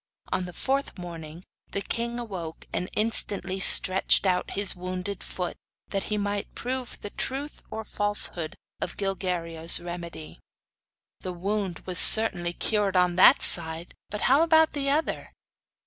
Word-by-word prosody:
On 185 - -1
the 180 - -8
fourth 275 +3 -2
morning 170 -1 -9 0.3
the 200 - -2
king 235 +1 -3
awoke 185 -9 -7
and 180 - -2
instantly 200 -3 -1
stretched 190 0 +4
out 180 -1 0
his 200 -1 +2
wounded 185 +2 -5
foot 180 -1 -5 0.3
that 195 -1 -3
he 210 - -2
might 205 0 -3
prove 255 0 -5
the 205 - -7
truth 280 +3 -3
or 220 0 -6
falsehood 195 -6 +3 0.3
of - - -5
Gilguerillo's 175 -4 0
remedy. 170 -2 -8 0.8
The 185 - -6
wound 195 0 -3
was 180 -2 -3
certainly 175 -6 +5
cured 205 0 -1
on 180 -1 +3
that 185 - +7
side, 165 0 +2 0.2
but 210 - -5
how 275 +4 +4
about 320 -1 +4
the 280 -1 -1
other? 300 +3 -1
190 Hz, 145 wpm, -26 LUFS, 175-220 Hz, 0.8 s, that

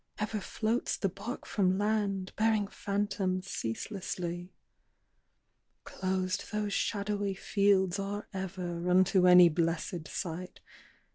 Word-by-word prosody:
Ever 215 0 -2
floats 220 +4 -1
the 195 - 0
bark 200 +7 -6
from 190 -2 +1
land, 205 -2 0
Bearing 220 -1 +2
phantoms 200 -2 -2
ceaselessly. 175 - -4 1.3
"Closed 185 0 -2
those 210 -1 -1
shadowy 205 -1 -1
fields 195 -1 +2
are 200 +1 -4
ever 180 -2 -3
Unto 185 0 +5
any 180 -1 +9
blessèd 165 0 -1
sight. 180 +2 -5
190 Hz, 100 wpm, -31 LUFS, 180-205 Hz, 1.3 s, any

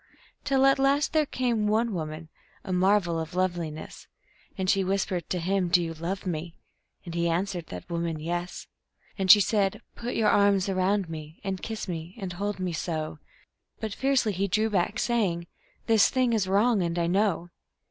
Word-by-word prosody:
Till 270 -1 +3
at 270 0 +4
last 280 +3 +2
there 310 -2 +3
came 235 -6 0
One 220 +1 +1
Woman, 155 -1 -5 0.3
a 190 - -3
marvel 180 -2 +2
of 160 +2 -6
loveliness, 175 -4 -3 0.5
And 190 -1 -2
she 195 0 +3
whispered 185 -3 -1
to 185 - -1
him: 185 +2 0
"Do 175 +1 +4
you 165 -1 -3
love 175 +5 -4
me?" 170 -1 -4 0.5
And 170 - -7
he 170 0 0
answered 175 0 -2
that 90 -1 -8
woman, 170 -2 -2
"Yes." 175 +3 -4 0.5
And 190 -1 -1
she 205 - +11
said: 200 -1 +1
"Put 240 +1 -5
your 215 -2 +3
arms 200 -2 +3
around 190 0 +1
me, 155 -1 -8
and 190 -2 -3
kiss 220 -2 -5
me, 170 0 -5
and 190 -3 -4
hold 200 +2 -3
me 180 -2 -2
so 155 -2 -3 0.3
" - - -48
But 220 -3 -4
fiercely 265 -3 +1
he 195 +2 0
drew 215 +3 +1
back, 180 -4 0
saying: 195 -8 0 0.4
"This 225 -3 +5
thing 255 -3 +1
is 210 -4 +1
wrong, 205 +2 +3
and 170 0 -1
I 170 - +1
know." 180 -1 +1
185 Hz, 185 wpm, -27 LUFS, 170-210 Hz, 0.5 s, she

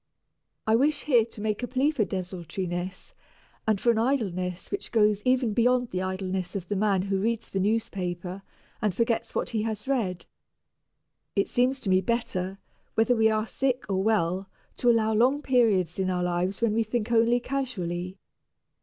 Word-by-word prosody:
I 220 - +4
wish 290 +6 +2
here 240 -7 +4
to 225 -2 -11
make 215 +1 -1
a 245 - -2
plea 265 +4 +2
for 260 -8 +1
desultoriness 180 -1 -4 0.5
and 215 -3 +2
for 235 - +4
an 225 - 0
idleness 185 -8 -1
which 400 - -4
goes 210 -2 +3
even 255 -3 +2
beyond 245 +1 +2
the 185 - -2
idleness 185 0 -3
of 185 -3 -4
the 205 - 0
man 195 -2 +2
who 195 -1 -1
reads 230 +1 -1
the 195 - -3
newspaper 190 -3 -2 0.4
and 210 -4 0
forgets 230 +1 0
what - - -1
he 220 -2 -1
has 215 +1 -3
read. 210 -10 -1 1.1
It 200 - +1
seems 255 +2 +2
to 195 - -3
me 185 0 +4
better, 195 -5 -1 0.4
whether 225 +2 +3
we 220 -1 +4
are 215 0 +1
sick 260 +1 -1
or 190 -1 +1
well, 190 -3 +1 0.3
to 245 - +2
allow 220 -2 +3
long 260 +7 +3
periods 205 -9 +2
in 190 -1 +1
our 180 -1 0
lives 180 +3 -1
when 225 -2 +3
we 225 - +2
think 225 +1 -2
only 230 +1 +4
casually. 190 -9 -3
215 Hz, 175 wpm, -27 LUFS, 185-235 Hz, 1.1 s, I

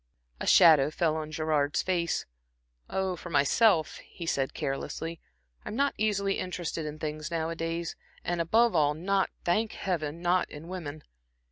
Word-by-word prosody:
A - - -4
shadow 150 -4 +7
fell 155 0 0
on 155 -1 -4
Gerard's 150 -2 0
face. 175 -3 0 0.6
"Oh, 190 -1 -1
for 175 - -9
myself," 160 +4 +3
he 170 - -10
said, 135 -4 -1
carelessly, 155 +3 -4 0.4
"I'm - - -6
not 280 +2 +2
easily 200 -2 0
interested 175 -3 -3
in 150 0 -6
things 155 0 -4
nowadays, 165 0 -2 0.3
and 175 -1 -1
above 225 +6 +3
all 150 -2 +3
not 190 +4 +1 0.2
thank 215 +6 +1
Heaven! 165 -4 -3
not 175 +1 +1
in 150 +3 -10
women." 155 -5 -6
165 Hz, 145 wpm, -29 LUFS, 155-185 Hz, 0.6 s, shadow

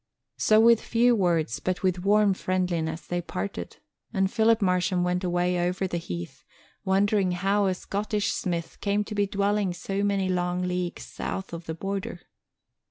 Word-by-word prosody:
So 215 0 +5
with 230 0 +6
few 240 +1 +3
words 170 - +1
but 185 0 -2
with 180 -1 0
warm 205 0 +4
friendliness 175 -4 -2
they 175 0 -2
parted, 185 +3 -5 0.3
and 190 -2 +1
Philip 230 -1 +3
Marsham 180 -2 +1
went 180 +1 0
away 180 0 +1
over 185 +1 -2
the 175 -2 -2
heath, 85 - -7 0.4
wondering 195 -1 +2
how 195 +3 +1
a 185 - +1
Scottish 205 +2 -2
smith 170 -3 -3
came 205 +1 +1
to 210 - -7
be 205 -1 +1
dwelling 200 -1 0
so 195 +2 -3
many 200 -2 +1
long 180 0 0
leagues 180 -1 -3
south 190 -2 -5
of 170 0 -7
the 160 - -3
border. 195 0 -4
185 Hz, 165 wpm, -26 LUFS, 180-200 Hz, 0.4 s, with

